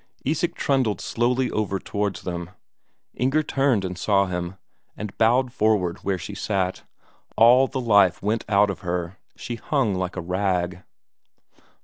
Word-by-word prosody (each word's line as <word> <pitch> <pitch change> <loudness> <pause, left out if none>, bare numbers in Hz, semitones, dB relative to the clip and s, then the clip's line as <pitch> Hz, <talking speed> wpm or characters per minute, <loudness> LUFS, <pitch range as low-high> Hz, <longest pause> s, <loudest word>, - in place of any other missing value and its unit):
Isak 160 +5 0
trundled 130 -7 +1
slowly 125 +2 0
over 105 -2 -1
towards 100 +1 -3
them. 85 -2 -4 0.6
Inger 135 +5 +1
turned 135 -8 +1
and 90 0 -4
saw 100 +1 +3
him, 90 0 -4 0.4
and 105 -2 -6
bowed 125 +2 +3
forward 105 -7 +1
where 100 -1 -1
she 95 +4 -7
sat; 95 -2 -2 0.6
all 125 +4 +6
the 130 - -4
life 100 -7 +4
went 110 +3 -1
out 100 -1 +4
of 95 - -7
her, 90 0 -4 0.2
she 120 - -6
hung 130 -4 0
like 90 -1 -3
a 90 - -3
rag. 90 0 -1
100 Hz, 145 wpm, -24 LUFS, 90-120 Hz, 0.6 s, all